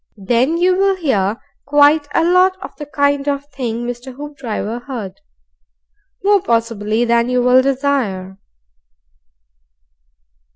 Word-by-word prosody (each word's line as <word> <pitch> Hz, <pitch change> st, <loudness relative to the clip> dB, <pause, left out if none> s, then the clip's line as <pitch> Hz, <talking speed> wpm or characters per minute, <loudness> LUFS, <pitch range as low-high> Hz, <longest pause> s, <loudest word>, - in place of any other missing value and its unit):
Then 240 Hz, -, +1 dB
you 365 Hz, +1 st, +3 dB
will 390 Hz, 0 st, +3 dB
hear 225 Hz, -, 0 dB, 0.3 s
quite 290 Hz, +1 st, +4 dB
a -, -, +3 dB
lot 365 Hz, +2 st, +3 dB
of -, -, -9 dB
the 295 Hz, -, -8 dB
kind 285 Hz, -1 st, 0 dB
of 280 Hz, 0 st, -1 dB
thing 240 Hz, -3 st, -4 dB
Mr. 245 Hz, +2 st, -7 dB
Hoopdriver 255 Hz, -6 st, -5 dB
heard. 225 Hz, -9 st, -7 dB, 1.0 s
More, 405 Hz, 0 st, +4 dB
possibly, 230 Hz, -, 0 dB
than 235 Hz, 0 st, +2 dB
you 250 Hz, -1 st, +1 dB
will 250 Hz, +1 st, +5 dB
desire. 255 Hz, -9 st, -1 dB
260 Hz, 120 wpm, -17 LUFS, 230-290 Hz, 1.0 s, will